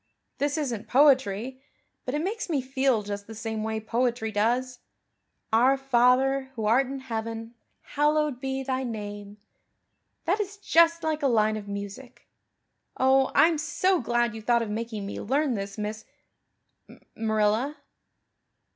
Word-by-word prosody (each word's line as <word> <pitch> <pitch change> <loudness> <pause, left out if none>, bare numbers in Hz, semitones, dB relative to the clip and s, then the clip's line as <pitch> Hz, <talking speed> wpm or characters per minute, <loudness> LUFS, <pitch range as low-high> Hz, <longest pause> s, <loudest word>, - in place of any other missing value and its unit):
This 285 +2 0
isn't 245 -8 -3
poetry, 260 -3 +3 0.4
but 255 - -2
it 300 - -1
makes 420 +2 -3
me 300 -4 +1
feel 265 -3 +1
just 200 0 -6
the 225 - -9
same 220 -1 -4
way 220 0 -2
poetry 230 0 -1
does. 245 +4 0 0.7
'Our 255 +4 +5
Father 265 +1 +2
who 220 -2 -3
art 245 +5 +3
in 270 0 -6
heaven 225 -2 -5 0.3
hallowed 295 -2 0
be 270 0 -2
Thy 260 0 -1
name.' 205 -3 -6 0.9
That 380 +6 +1
is 405 0 -4
just 335 -3 +3
like 315 -1 -1
a 280 - +2
line 215 -3 +2
of 210 -1 -7
music. 200 +5 -8 0.7
Oh, 265 +1 +3
I'm 325 -1 +5
so 360 +3 +1
glad 240 -1 0
you 225 - -7
thought 235 +1 +2
of 215 - -5
making 220 -1 -4
me 200 - -5
learn 275 +4 +1
this, 200 -1 -5
Miss 215 +1 -4 1.1
Marilla." 220 +6 0
245 Hz, 145 wpm, -26 LUFS, 220-275 Hz, 1.1 s, Our